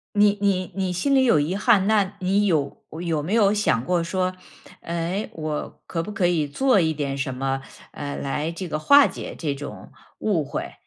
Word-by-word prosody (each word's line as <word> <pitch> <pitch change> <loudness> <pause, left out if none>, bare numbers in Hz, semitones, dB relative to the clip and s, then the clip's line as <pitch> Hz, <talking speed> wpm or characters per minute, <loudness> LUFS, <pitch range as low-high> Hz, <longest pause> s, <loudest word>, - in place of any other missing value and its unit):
你 205 0 +4
你 190 -3 +1
你 190 -2 -1
心 275 +11 +1
里 265 -1 +5
有 230 -11 +4
遗 155 +6 -1
憾， 205 -2 +3
那 205 -3 +2
你 195 +3 +2
有 155 -7 0 0.2
有 160 -4 -1
没 180 +7 -3
有 210 -3 +4
想 205 - +1
过 175 +2 +1
说， 185 +2 -1 0.5
哎， 170 +5 -3
我 155 -2 -5
可 165 -1 -2
不 210 - -6
可 185 -3 +2
以 165 -4 +1
做 255 - +3
一 160 -2 +2
点 140 -2 -3
什 135 -1 -2
么， 135 +1 -2 0.3
呃， 145 -1 -5
来 150 +3 -2
这 175 +2 -6
个 155 - -1
化 280 - +6
解 - - -7
这 145 -4 -2
种 145 +1 -9 0.3
误 190 -8 +1
会？ - - -5
175 Hz, 210 characters per minute, -23 LUFS, 150-200 Hz, 0.5 s, 化